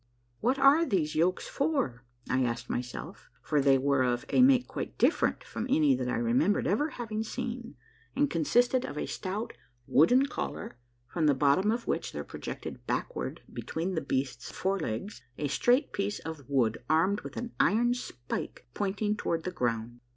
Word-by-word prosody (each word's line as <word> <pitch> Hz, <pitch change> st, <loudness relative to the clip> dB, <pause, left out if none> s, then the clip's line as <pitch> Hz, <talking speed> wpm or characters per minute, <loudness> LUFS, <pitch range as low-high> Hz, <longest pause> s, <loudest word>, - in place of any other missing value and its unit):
" 120 Hz, 0 st, -42 dB
What 255 Hz, +4 st, +2 dB
are 280 Hz, +4 st, +6 dB
those 175 Hz, -, 0 dB
yokes 175 Hz, +4 st, +1 dB
for?" 275 Hz, -, -1 dB, 0.2 s
I 130 Hz, 0 st, +2 dB
asked 120 Hz, 0 st, -2 dB
myself, 125 Hz, 0 st, -5 dB
for 150 Hz, -2 st, +2 dB
they 135 Hz, -1 st, +5 dB
were 140 Hz, 0 st, +2 dB
of 125 Hz, -1 st, 0 dB
a -, -, +4 dB
make 255 Hz, -1 st, +5 dB
quite -, -, -5 dB
different -, -, +2 dB
from 230 Hz, -, -5 dB
any 150 Hz, -, +4 dB
that 125 Hz, -1 st, -1 dB
I -, -, 0 dB
remembered 125 Hz, -, +2 dB
ever 290 Hz, -, +1 dB
having 220 Hz, -5 st, -4 dB
seen, 240 Hz, +1 st, -5 dB, 0.4 s
and 145 Hz, -, +3 dB
consisted 245 Hz, -, +2 dB
of 145 Hz, -, -6 dB
a -, -, -1 dB
stout 205 Hz, +4 st, -4 dB, 0.3 s
wooden 245 Hz, -, +5 dB
collar 275 Hz, -, -5 dB, 0.3 s
from 155 Hz, +5 st, 0 dB
the 145 Hz, -, +4 dB
bottom 145 Hz, +9 st, +3 dB
of 235 Hz, +2 st, 0 dB
which -, -, -2 dB
there -, -, -4 dB
projected -, -, -7 dB
backward -, -, -3 dB
between 170 Hz, +4 st, -3 dB
the 160 Hz, -, -1 dB
beast's 130 Hz, -3 st, -2 dB
forelegs 190 Hz, -, -2 dB, 0.2 s
a 150 Hz, -, -1 dB
straight 245 Hz, -, +2 dB
piece 200 Hz, +1 st, -1 dB
of 155 Hz, -5 st, -8 dB
wood 120 Hz, -5 st, +1 dB
armed 185 Hz, +6 st, +3 dB
with -, -, -9 dB
an 240 Hz, -1 st, -4 dB
iron 240 Hz, +4 st, +4 dB
spike 125 Hz, -, -6 dB
pointing 205 Hz, +1 st, -1 dB
toward 165 Hz, -5 st, -2 dB
the 185 Hz, -, -3 dB
ground. 120 Hz, -5 st, -2 dB
165 Hz, 175 wpm, -29 LUFS, -, 0.4 s, are